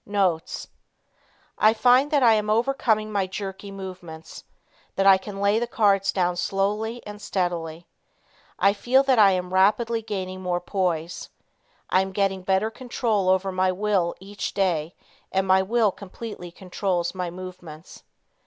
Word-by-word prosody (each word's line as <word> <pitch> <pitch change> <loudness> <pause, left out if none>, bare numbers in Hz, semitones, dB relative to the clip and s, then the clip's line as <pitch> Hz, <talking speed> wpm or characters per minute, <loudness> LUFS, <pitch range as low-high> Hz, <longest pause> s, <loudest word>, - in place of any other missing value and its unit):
Notes. 190 -5 -1 0.9
I 220 +1 +5
find 250 +5 +4
that 290 -3 +2
I 230 -2 +7
am 210 -1 0
overcoming 220 -2 +1
my 200 -2 0
jerky 195 +1 -6
movements, 185 -5 -9 0.5
that 195 - +1
I 195 -1 +7
can 195 0 -8
lay 200 +2 +2
the 240 - -2
cards 200 -5 +2
down 180 -2 0
slowly 210 +6 -1
and 210 0 -9
steadily. 170 -3 -3 0.7
I 200 - +4
feel 255 +6 +3
that 265 -4 +3
I 205 -2 +8
am 180 0 -3
rapidly 215 +5 +2
gaining 190 -4 -5
more 180 -1 -1
poise. 175 -3 -2 0.6
I 185 - +4
am 190 0 -4
getting 195 -1 0
better 190 +4 +1
control 225 -5 -1
over 190 +1 +2
my 185 0 +1
will 190 -2 0
each 200 +2 -6
day, 175 -4 0 0.4
and 190 0 +1
my 190 0 +5
will 220 +1 +2
completely 200 -1 -9
controls 180 -1 -2
my 180 -2 -3
movements. 180 -2 -10
195 Hz, 150 wpm, -24 LUFS, 185-215 Hz, 0.9 s, I